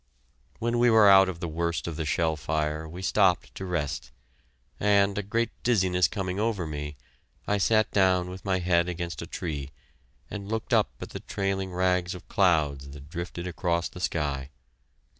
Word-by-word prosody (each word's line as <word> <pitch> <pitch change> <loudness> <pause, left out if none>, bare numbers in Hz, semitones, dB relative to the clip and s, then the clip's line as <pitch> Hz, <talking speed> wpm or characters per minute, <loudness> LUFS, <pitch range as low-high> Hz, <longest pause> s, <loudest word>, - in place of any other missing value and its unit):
When 120 +1 0
we 120 0 +5
were 110 -2 +7
out 95 -1 +7
of 85 -2 -6
the 85 - -2
worst 85 +1 -2
of 85 - -4
the 80 -1 -3
shell 80 0 +1
fire, 75 +1 -2
we 90 +4 -8
stopped - - +2
to 95 - -6
rest, 80 -6 -3 0.7
and, 100 -1 +3
a 105 - 0
great 115 +4 -1
dizziness 95 -8 +3
coming 95 +3 -3
over 105 -5 0
me, 75 -1 -5 0.5
I 105 0 +1
sat 110 +2 +3
down 95 -2 +2
with 95 0 -9
my 95 -1 +1
head 85 -1 +2
against 85 -4 -4
a - - -6
tree, 75 -6 -4 0.6
and 100 -1 -6
looked 110 0 -2
up - - +4
at - - -6
the - - -6
trailing 95 -1 -2
rags 90 0 +1
of 90 - -11
clouds 75 -7 +2
that 70 +1 -11
drifted 85 +1 -5
across 85 -1 -1
the - - -10
sky. 70 -6 -2
90 Hz, 180 wpm, -27 LUFS, 80-95 Hz, 0.7 s, were